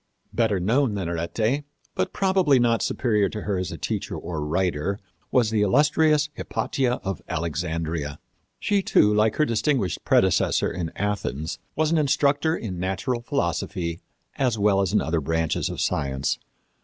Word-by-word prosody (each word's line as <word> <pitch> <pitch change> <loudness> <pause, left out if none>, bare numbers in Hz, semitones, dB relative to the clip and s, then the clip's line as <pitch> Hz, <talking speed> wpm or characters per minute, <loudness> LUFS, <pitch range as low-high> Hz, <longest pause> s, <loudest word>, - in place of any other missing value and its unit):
Better 110 -5 +2
known 115 +5 +2
than 95 -4 -2
Arete, 110 - -1 0.3
but - - -1
probably 190 -8 +3
not 120 -2 +2
superior 105 -6 +1
to 105 - -5
her 100 -2 -1
as 90 - -3
a - - -6
teacher - - -3
or 80 -3 -4
writer, 90 +3 0 0.3
was 120 -4 +2
the 110 -2 +2
illustrious 150 +7 +3
Hypatia 130 -3 -1
of 95 -6 -3
Alexandria. 80 -2 -2 0.4
She, 205 -1 +1
too, 105 - +4
like 105 +1 +3
her 155 - +3
distinguished 115 - 0
predecessor - - +3
in 85 -2 -4
Athens, 80 -6 -2 0.2
was 155 +1 +1
an 165 - +3
instructor 145 +2 +2
in 95 -6 -5
natural 95 +7 -1
philosophy, 85 - -2 0.4
as 125 -5 +1
well 100 -1 +3
as 95 - 0
other 80 0 0
branches 80 +2 0
of - - -5
science. 70 0 -1
105 Hz, 150 wpm, -24 LUFS, 85-130 Hz, 0.4 s, too